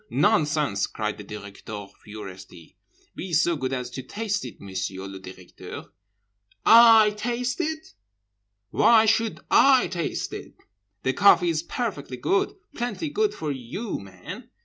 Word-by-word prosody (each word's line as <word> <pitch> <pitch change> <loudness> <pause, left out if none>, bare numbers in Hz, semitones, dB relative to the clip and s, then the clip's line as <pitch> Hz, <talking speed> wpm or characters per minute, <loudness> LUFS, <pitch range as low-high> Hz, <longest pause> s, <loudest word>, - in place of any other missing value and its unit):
Nonsense!' 150 - +2
cried 105 -1 -4
the - - -7
Directeur 105 0 -8 0.2
furiously.—'Be 100 - -11
so 165 +2 +3
good 130 -3 -3
as 125 -1 -3
to 130 - -6
taste 205 - -3
it, - - -9
Monsieur 95 0 -5
le 95 0 -8
Directeur.'—'I 100 - +2
taste 245 +6 -2
it? 315 -1 -4 0.8
Why 225 -1 +5
should 225 0 +1
I 270 -2 +6
taste 170 -3 -3
it? - - -8 0.5
The 130 - +1
coffee 195 -2 +5
is 160 -2 0
perfectly 150 - -4
good, 200 - 0 0.2
plenty 245 +6 -3
good 425 +3 +1
for 155 -2 -3
you 140 - -5
men. 95 -2 -10
145 Hz, 125 wpm, -25 LUFS, -, 0.8 s, I